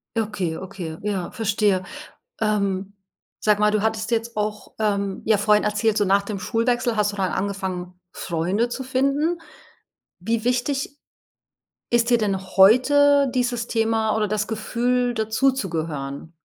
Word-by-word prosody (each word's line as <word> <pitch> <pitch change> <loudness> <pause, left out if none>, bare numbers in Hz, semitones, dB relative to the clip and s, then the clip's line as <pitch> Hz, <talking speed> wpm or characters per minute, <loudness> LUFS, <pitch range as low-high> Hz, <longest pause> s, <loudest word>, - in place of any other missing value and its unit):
Okay, 210 -7 -2
okay, 180 -4 -7
ja, 195 -4 -2
verstehe. 205 -3 +1 0.6
Ähm, 200 -2 0 0.5
sag 210 -1 +2
mal, 210 0 +4
du 215 - +1
hattest 220 +1 -1
jetzt 230 -1 -1
auch, 210 0 -3
ähm, 200 -2 -1
ja 215 -2 +4
vorhin 210 +1 +3
erzählt, 210 +1 +1
so 205 - +2
nach 195 +1 +3
dem 200 -1 -5
Schulwechsel 240 +2 0
hast 210 -1 +1
du - - -6
dann 190 -2 0
angefangen, 185 -2 -4
Freunde 185 +8 -1
zu 265 +2 -4
finden. 275 +6 0 0.8
Wie 225 +4 -1
wichtig 270 +3 -1 0.9
ist 235 0 +3
dir 240 - +5
denn 200 -4 0 0.2
heute 280 +7 +6
dieses 245 -2 -1
Thema 225 -1 +1
oder 215 -1 +1
das 210 +1 -1
Gefühl, 240 +3 0
dazuzugehören? 170 - -2
215 Hz, 140 wpm, -23 LUFS, 195-235 Hz, 0.9 s, heute